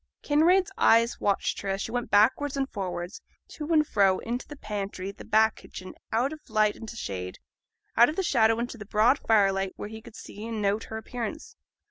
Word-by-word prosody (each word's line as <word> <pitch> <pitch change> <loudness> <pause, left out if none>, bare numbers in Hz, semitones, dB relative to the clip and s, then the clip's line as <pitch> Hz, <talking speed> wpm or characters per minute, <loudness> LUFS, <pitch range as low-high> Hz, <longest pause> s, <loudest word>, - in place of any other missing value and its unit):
Kinraid's 340 +5 +3
eye 230 +1 +6
watched 200 -1 0
her 200 - -4
as 195 0 -1
she - - -5
went 245 0 -3
backwards 260 +7 +3
and 270 -1 0
forwards, 185 -3 -5 0.3
to 305 +1 -6
and 305 -2 +4
fro, 195 -7 +3
into 240 +2 -4
the 295 - -9
pantry, 200 -5 -5
the - - -12
back 220 +1 +3
kitchen, 185 0 -10 0.2
out 250 +6 +1
of 310 - -9
light 215 -1 +2
into 225 0 -9
shade, 90 - -5 0.6
out 240 +3 +6
of 305 - -4
the 385 - -1
shadow 225 -8 +3
into 235 0 -4
the 210 - -8
broad 220 +7 +3
firelight 195 -3 +2
where 205 - -7
he 220 0 -9
could 230 -1 -14
see 205 - -10
and 225 -1 -4
note 205 +1 0
her 220 - -6
appearance. 250 - -6
220 Hz, 200 wpm, -27 LUFS, 200-260 Hz, 0.6 s, eye